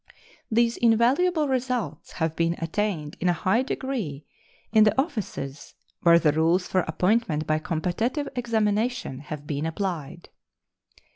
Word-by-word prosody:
These 230 +1 +2
invaluable 270 +9 +3
results 250 - -2
have 160 -1 -1
been 165 0 +1
attained 165 -3 -2
in 180 - +1
a - - +4
high 190 +8 +2
degree 245 - -4 0.5
in 215 -1 +6
the 215 +4 +3
offices 200 - -4 0.3
where 170 -1 +7
the 160 -3 +3
rules 165 +4 +2
for 185 - +1
appointment 175 -1 +1
by 155 0 +1
competitive 185 - -1
examination 225 - 0
have 150 0 -7
been 145 +1 -2
applied. 165 -4 -4
190 Hz, 130 wpm, -25 LUFS, 160-235 Hz, 0.5 s, where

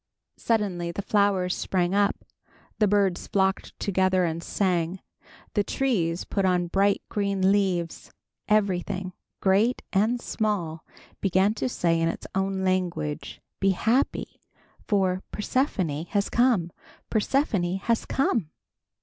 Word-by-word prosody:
Suddenly 195 -7 0
the 200 +4 -5
flowers 200 -3 +2
sprang 180 -1 0
up; 200 0 +1 0.5
the 210 - +4
birds 195 -3 +1
flocked 190 -1 0
together 185 -2 +2
and 165 0 -2
sang; 180 -1 0 0.5
the 205 - +2
trees 185 -11 0
put 195 - -1
on 180 -1 +2
bright 195 +3 +2
green 200 -2 +1
leaves. 185 -5 0 0.4
Everything, 195 -2 0 0.3
great 205 +6 +2
and 220 +5 +2
small, 195 -9 -2 0.4
began 190 +2 +2
to 250 - -2
say 165 -7 +1
in 165 - +2
his - - -5
own 190 0 -1
language, 180 -5 -2 0.2
"Be 195 -1 +3
happy 245 +5 0 0.5
for 190 -3 +1
Persephone 190 - -1
has 200 +2 -1
come! 235 -9 +2 0.4
Persephone 205 -6 +1
has 230 +4 0
come!" 230 - 0
195 Hz, 120 wpm, -26 LUFS, 180-205 Hz, 0.5 s, the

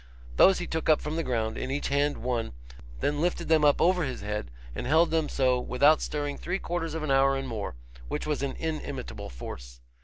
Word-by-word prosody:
Those 190 - +7
he 175 - -3
took 160 -1 -2
up 155 - +6
from 150 +1 -4
the 165 - 0
ground, 115 -6 -2
in - - -4
each 140 +2 -2
hand 145 +1 +1
one, 120 - -1 0.5
then 145 +1 0
lifted 175 -1 -1
them 160 -2 +4
up 145 -1 +5
over 180 0 +3
his 130 -3 -4
head, 105 -9 -4 0.2
and - - -4
held 160 +4 +4
them 160 -2 +1
so 130 -2 +2
without 145 +5 +4
stirring 145 -1 -3
three 180 +2 -2
quarters 165 -4 -3
of 160 - -3
an 150 - -1
hour 135 0 +4
and 135 0 -4
more, 110 - -4 0.3
which - - -3
was 150 -2 -1
an 140 -1 -2
inimitable 155 - -5
force. - - -9
145 Hz, 215 wpm, -28 LUFS, 125-160 Hz, 0.5 s, Those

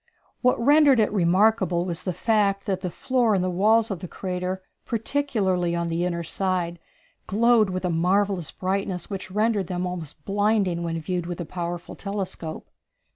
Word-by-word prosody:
What 250 -1 +3
rendered 285 +1 +5
it 210 -1 +2
remarkable 185 -1 +3
was 175 -1 -2
the 185 - -2
fact 200 +1 +1
that 190 -2 -1
the 185 - -2
floor 240 +3 +1
and 185 - +1
the 185 - 0
walls 220 +5 +3
of 190 - -3
the 180 - -6
crater, 185 +1 -4 0.2
particularly 210 -8 0
on 170 0 -1
the 170 +2 0
inner 170 -1 -2
side, 175 -1 -1 0.5
glowed 225 0 +4
with 185 0 -3
a 180 - +1
marvellous 180 0 +1
brightness 190 0 -3
which 190 -1 -5
rendered 210 -1 +1
them 180 0 -2
almost 165 -5 -6
blinding 200 -3 +1
when 165 -1 -2
viewed 175 +1 -3
with 175 0 -5
a 175 - -3
powerful 175 +1 -5
telescope. 195 -5 -5
185 Hz, 170 wpm, -25 LUFS, 175-210 Hz, 0.5 s, rendered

